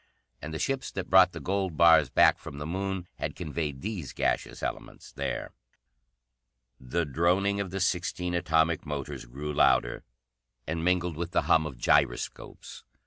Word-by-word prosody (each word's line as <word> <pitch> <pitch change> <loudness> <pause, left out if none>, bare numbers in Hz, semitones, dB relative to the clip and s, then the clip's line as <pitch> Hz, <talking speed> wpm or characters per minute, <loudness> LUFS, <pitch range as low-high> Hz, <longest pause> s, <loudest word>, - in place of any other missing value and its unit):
And 80 - -6
the 80 - -4
ships 135 +9 -2
that 95 -2 -5
brought 95 -1 +7
the - - -7
gold 95 -4 -2
bars 85 -1 +6
back - - +4
from 70 - -9
the 75 - -5
Moon 95 +1 -3
had - - -4
conveyed 75 -3 -4
these 100 - -5
gaseous - - -1
elements - - -6
there. - - -4 1.3
The 75 +7 -2
droning 90 +7 +1
of 100 -2 -2
the 95 +2 -4
sixteen 90 -1 -1
atomic 80 -1 +1
motors 70 -4 -5
grew 70 +5 -6
louder, - - +2 0.6
and 80 +3 -3
mingled 90 -2 +1
with 85 +1 -4
the - - +2
hum 80 -1 +3
of 65 -5 -9
gyroscopes. 70 -1 -1
85 Hz, 155 wpm, -28 LUFS, 75-90 Hz, 1.3 s, brought